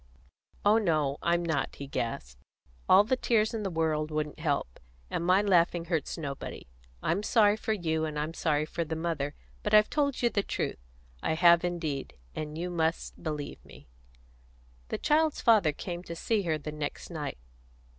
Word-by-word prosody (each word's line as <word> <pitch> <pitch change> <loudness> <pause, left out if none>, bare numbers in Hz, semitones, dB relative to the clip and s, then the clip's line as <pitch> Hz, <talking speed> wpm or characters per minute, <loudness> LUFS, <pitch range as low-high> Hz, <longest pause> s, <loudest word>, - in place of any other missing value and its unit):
"Oh 215 +2 +6
no, 155 -8 +1
I'm 170 0 +1
not," 155 -5 -1
he 140 - -7
gasped. 75 - -4 0.5
"All 195 +2 +8
the 250 +5 +1
tears 225 -3 +2
in 225 - -2
the 200 - -2
world 160 -2 0
wouldn't 155 0 -3
help; 140 - -1 0.3
and - - -1
my 185 +3 +4
laughing 175 -3 +3
hurts 165 -2 -2
nobody. 140 - -6 0.4
I'm 175 +5 +1
sorry 210 -1 +4
for 220 0 -1
you, 160 -5 0
and 155 -1 -4
I'm 155 +2 -2
sorry 155 -2 +1
for 170 +2 -3
the 160 0 -4
mother; 160 -3 -2 0.3
but 210 0 +2
I've 210 0 +6
told 280 -4 0
you 240 - +4
the 200 - +1
truth - - -3 0.4
I 160 - 0
have 170 0 +6
indeed; 165 -6 -3 0.2
and 150 0 -5
you 180 +2 -3
must 165 -1 -1
believe 150 -2 -5
me." - - -16 1.0
The - - -2
child's 310 0 +2
father 215 -9 +5
came 175 +3 -6
to 170 - -6
see 215 +5 0
her 155 - +2
the 150 0 -6
next 150 +3 -5
night. 150 -4 -4
165 Hz, 175 wpm, -29 LUFS, 150-200 Hz, 1.0 s, All